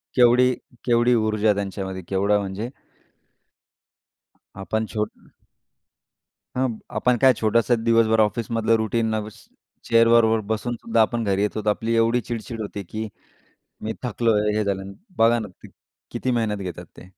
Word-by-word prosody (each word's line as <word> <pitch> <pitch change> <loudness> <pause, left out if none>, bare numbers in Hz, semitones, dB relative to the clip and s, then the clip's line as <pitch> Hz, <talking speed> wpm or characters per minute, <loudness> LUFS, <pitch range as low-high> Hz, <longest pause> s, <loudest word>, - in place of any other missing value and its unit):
केवढी 125 0 +5 0.4
केवढी 120 0 +3
ऊर्जा 110 -1 +2
त्यांच्यामध्ये 95 -1 -4
केवढा 100 +2 +2
म्हणजे 100 +4 -4 2.0
आपण 110 +4 -1
छोट 105 -1 -1 1.4
हां, 130 +1 +1
मग 110 - -6 0.2
आपण 125 -1 +2
काय 130 -1 +7
छोटंसं 115 +1 +1
दिवसभर 115 -1 +3
ऑफिसमधलं 115 +1 +1
रुटीन 110 0 0 0.7
चेअरवर 115 0 +5 0.3
बसून 120 +2 -2
सुद्धा 115 0 0
आपण 115 +1 +1
घरी 100 -1 0
येत 105 - -1
होतो, 105 0 -1
आपली 115 +2 -1
एवढी 115 +2 +2
चिड-चिड 115 0 -6
होती 100 -1 -5
की 110 0 -4 0.8
मी 110 - -2
थकलोय 110 -3 +1
हे 110 - +1
झालं. 100 -1 -3 0.2
बघा 115 +1 +4
ना, 105 -3 -5 0.6
किती 130 - -2
मेहनत 110 -4 0
घेतात 90 +1 -10
ते. - - -12
110 Hz, 135 wpm, -23 LUFS, 105-115 Hz, 2.0 s, काय